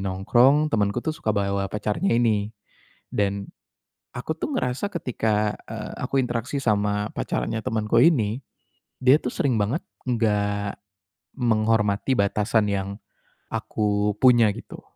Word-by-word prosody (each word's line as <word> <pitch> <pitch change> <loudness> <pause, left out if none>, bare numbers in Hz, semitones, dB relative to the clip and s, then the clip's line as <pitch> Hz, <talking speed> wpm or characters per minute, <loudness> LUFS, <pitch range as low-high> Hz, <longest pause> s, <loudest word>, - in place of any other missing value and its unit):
nongkrong, 120 +11 +3
temanku 105 +2 0
tuh 155 - 0
suka 135 - -7
bawa 100 -1 0
pacarnya 105 - -1
ini. 110 -4 +2 0.6
Dan, 100 -1 -1 0.7
aku 125 +6 -3
tuh - - -1
ngerasa 130 - -1
ketika, 110 - 0 0.2
e - - -6 0.3
aku 135 - -2
interaksi 125 +2 -3
sama 105 -2 +1
pacarnya 110 0 -2
temanku 110 +1 +1
ini, 120 -8 +3 0.6
dia 130 +1 +6
tuh - - -4
sering 135 -4 +1
banget 110 +10 0 0.3
enggak 105 -4 0 0.6
menghormati 110 0 +2
batasan 105 +2 +2
yang 95 -1 -1 0.6
aku 105 -1 0
punya, 120 -4 +6
gitu. - - -10
110 Hz, 120 wpm, -24 LUFS, 105-125 Hz, 0.7 s, dia